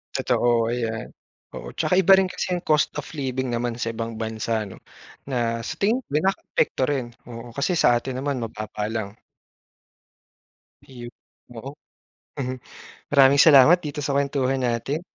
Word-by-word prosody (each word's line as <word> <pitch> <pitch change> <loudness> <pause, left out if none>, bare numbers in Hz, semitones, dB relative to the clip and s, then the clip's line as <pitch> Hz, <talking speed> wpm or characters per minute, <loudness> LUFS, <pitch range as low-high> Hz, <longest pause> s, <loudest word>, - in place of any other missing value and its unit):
Totoo 120 -1 +1
ayan, 115 -2 -3 0.4
oo. - - -7
Saka - - 0
iba 190 +1 +7
rin 195 - +3
kasi 185 -1 -3
yung - - -10
cost 155 -1 +3
of 150 - -4
living 130 -3 -3
naman 120 0 -2
sa 115 -1 -3
ibang 115 0 -5
bansa 110 0 -2
no, 95 - -12 0.5
na 115 -2 -1
sa 110 - -5
tingin 225 +6 +1
ko - - -47
nakaka-apekto 190 -5 0
rin, 135 -4 -1 0.2
oo. 115 0 -9
Kasi 155 +6 0
sa 120 - +4
atin 130 +1 -5
naman, 135 -2 -2
mababa 105 -1 -5
lang. 110 -2 -5 1.7
Iyon 120 -2 -10 0.5
oo. 135 +5 -7 0.7
Mhm, 130 -1 -2 0.6
maraming 140 -1 +6
salamat 150 +3 +8
dito 150 0 -4
sa 140 -1 -1
kwentuhan 135 -1 0
natin. 135 +8 -2
130 Hz, 150 wpm, -23 LUFS, 115-145 Hz, 1.7 s, salamat